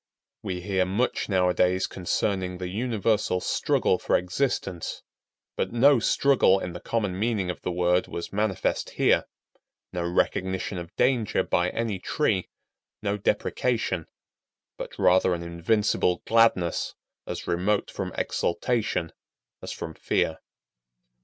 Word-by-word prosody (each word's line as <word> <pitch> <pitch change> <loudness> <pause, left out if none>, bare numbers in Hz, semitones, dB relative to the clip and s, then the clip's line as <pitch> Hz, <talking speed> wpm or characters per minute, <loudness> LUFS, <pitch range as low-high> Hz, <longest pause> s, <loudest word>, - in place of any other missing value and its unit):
We 90 -1 -4
hear 95 0 +1
much 100 +8 -1
nowadays 90 -1 +2
concerning 95 0 -1
the 90 0 -4
universal 110 -3 0
struggle - - +1
for - - +2
existence, 90 -2 -2 0.5
but - - -1
no 135 +3 +5
struggle 120 -5 +4
in 90 -2 -5
the 90 - -6
common 100 -4 -2
meaning 105 -5 0
of - - -10
the 90 - -2
word 90 +1 +2
was 85 - -6
manifest 105 -2 0
here; - - +3 0.7
no 90 - -2
recognition 95 +2 -1
of 85 0 -9
danger 120 -5 +2
by 90 0 +1
any 110 -3 -2
tree; 100 -3 0 0.5
no 100 -1 0
deprecation; 105 -3 -1 0.7
but - - -8
rather 90 0 +4
an 85 - -6
invincible 90 +2 +1
gladness 115 -7 +2 0.3
as - - -5
remote 95 +4 0
from - - -4
exultation 110 -4 -1 0.5
as - - -6
from 80 - -6
fear. 80 +1 0
95 Hz, 125 wpm, -26 LUFS, 90-110 Hz, 0.7 s, no